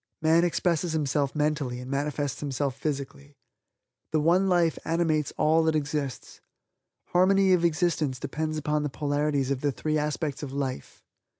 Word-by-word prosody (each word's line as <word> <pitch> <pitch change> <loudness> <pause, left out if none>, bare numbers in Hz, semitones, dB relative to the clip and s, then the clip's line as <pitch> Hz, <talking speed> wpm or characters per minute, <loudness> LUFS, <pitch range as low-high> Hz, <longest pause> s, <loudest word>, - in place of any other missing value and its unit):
Man 160 +2 +4
expresses 175 -1 0
himself 145 -2 0
mentally 150 -5 -1
and 125 +1 -7
manifests 145 0 -2
himself 140 -2 -2
physically. 140 -1 -5 0.7
The 155 - +2
One 175 +5 +3
Life 175 -3 +2
animates 160 -3 0
all 160 +2 +4
that 160 -1 +2
exists. 145 -3 -3 0.7
Harmony 190 +1 +4
of 175 -2 +2
existence 160 -5 +1
depends 155 +2 -3
upon 150 0 0
the 150 - -2
polarities 145 -1 -1
of 135 -1 -1
the 145 - +1
three 155 +7 -1
aspects 150 -1 -2
of 145 -3 -5
life. 135 - -5
150 Hz, 145 wpm, -27 LUFS, 140-160 Hz, 0.7 s, Man